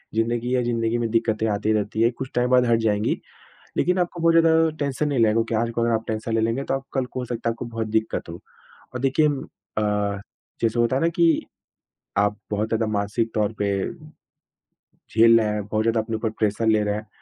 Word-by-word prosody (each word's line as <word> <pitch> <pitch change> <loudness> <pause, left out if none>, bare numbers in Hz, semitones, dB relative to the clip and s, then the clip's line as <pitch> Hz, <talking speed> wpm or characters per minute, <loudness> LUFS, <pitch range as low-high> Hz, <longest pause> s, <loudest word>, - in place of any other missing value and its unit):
ज़िंदगी 120 +2 0
है, 125 -1 +2
ज़िंदगी 115 -1 0
में 115 -1 -1
दिक्कतें 110 -1 +1
आती 105 +1 0
रहती 105 +1 -1
हैं 115 +1 +4
कुछ 130 0 -5
टाइम 125 0 +2
बाद 125 -1 +5
हट 115 -1 +3
जाएँगी। 105 -2 0 0.6
लेकिन 180 +1 +2
आपको 175 -1 -1
बहुत 165 0 +4
ज़्यादा 165 -1 +5
टेंशन 140 +1 -1
नहीं 140 -3 0
लेनी 110 -2 +4
क्योंकि 115 0 0
आज 115 +1 0
को 115 - -2
अगर 115 0 +2
आप 110 0 -1
टेंशन 110 +1 -3
ले 115 - +2
लेंगे, 115 +4 0
तो - - -2
आप 135 0 -2
कल 130 -2 0
को 125 - -7
हो 125 - -3
सकता 115 -1 -2
है, - - 0
आपको 120 - -7
बहुत 115 -1 -4
दिक्कत 110 -4 -1
हो। 85 +1 -8 0.5
और 125 - -3
देखिए 135 +4 +3
अ, 105 -6 -3 0.4
जैसे 115 +1 +1
होता 120 +2 +2
है 135 - 0
ना 165 - +4
कि, 170 -1 +2 0.7
आप 105 0 +2
बहुत 105 +1 -1
ज़्यादा 115 0 0
मानसिक 105 +2 -1
तौर 105 0 +1
पे 100 - 0 1.2
झेल 115 +1 +4
रहे 110 - +1
हैं, 105 -1 -2
बहुत 110 +1 0
ज़्यादा 115 0 +2
अपने 110 +1 -4
ऊपर 110 +1 -1
प्रेशर 110 0 -1
ले 110 -1 +3
रहे 105 0 0
हैं। 105 +1 -6
115 Hz, 225 wpm, -23 LUFS, 110-125 Hz, 1.2 s, बाद